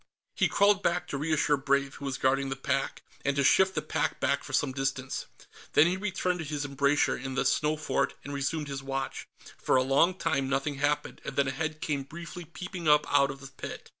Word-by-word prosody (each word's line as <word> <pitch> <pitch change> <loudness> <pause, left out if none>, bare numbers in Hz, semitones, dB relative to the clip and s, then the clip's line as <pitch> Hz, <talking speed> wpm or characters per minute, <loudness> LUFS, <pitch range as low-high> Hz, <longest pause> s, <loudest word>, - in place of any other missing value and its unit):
He - - +2
crawled 200 0 +4
back 175 -1 0
to 140 - -2
reassure 150 -1 +2
Brave, 140 0 +1
who 140 - -7
was 135 -2 -2
guarding 135 +1 +1
the 135 - -2
pack, 135 0 -2 0.2
and 140 0 +1
to 140 - +2
shift 190 +7 +4
the - - -1
pack - - -1
back - - +1
for - - -9
some 145 - +1
distance. 135 -1 -2 0.5
Then 150 - +7
he 175 +2 +2
returned 190 -2 -1
to - - -3
his 145 -1 -3
embrasure 140 +1 +2
in 135 0 -5
the - - +1
snow 155 +1 +2
fort 145 -2 0
and 145 - -6
resumed 140 +2 -2
his 135 -1 -4
watch. 135 0 -4 0.3
For - - +2
a 130 - +4
long 140 +7 +3
time, 140 -7 0
nothing 135 +1 -1
happened, 145 +1 -1
and 135 - -6
then 140 -1 +2
a - - 0
head 155 +2 -3
came 145 -3 -1
briefly 170 +4 -8
peeping 175 +1 -6
up 150 0 +5
out 140 -1 +5
of 135 0 -7
the 135 0 -10
pit. - - -7
140 Hz, 225 wpm, -29 LUFS, 135-160 Hz, 0.5 s, Then